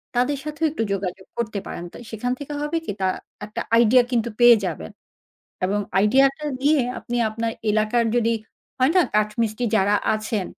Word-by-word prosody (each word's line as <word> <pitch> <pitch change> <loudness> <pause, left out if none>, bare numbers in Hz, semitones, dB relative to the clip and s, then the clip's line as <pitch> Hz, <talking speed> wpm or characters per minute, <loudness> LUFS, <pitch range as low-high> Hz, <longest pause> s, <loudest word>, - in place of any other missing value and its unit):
তাদের 250 +4 +1
সাথেও 305 +1 -2
একটু 285 - -2
যোগাযোগ 190 -1 -4
করতে 220 -3 -2
পারেন। 170 - -6
তো - - -9
সেখান 230 +3 -3
থেকে 290 0 -6
হবে 295 +3 -1
কি? - - -2
তা 190 - +2 0.4
একটা 220 +2 -5 0.2
আইডিয়া 240 +2 +6
কিন্তু 235 -1 +1
পেয়ে 240 0 +8
যাবেন। 155 - -5 0.7
এবং 200 +2 0 0.2
আইডিয়াটা 270 +8 +3 0.2
নিয়ে 290 0 +4 0.2
আপনি 240 0 -4
আপনার 225 +1 -2 0.2
এলাকার 215 +2 +2
যদি, 230 -1 +2 0.5
হয় 260 +3 +4
না? 365 - +7
কাঠ 210 0 +3
মিস্ত্রি 225 +2 -1
যারা 205 0 +3 0.2
আছেন, 215 -2 -2
230 Hz, 170 wpm, -23 LUFS, 210-260 Hz, 0.7 s, পেয়ে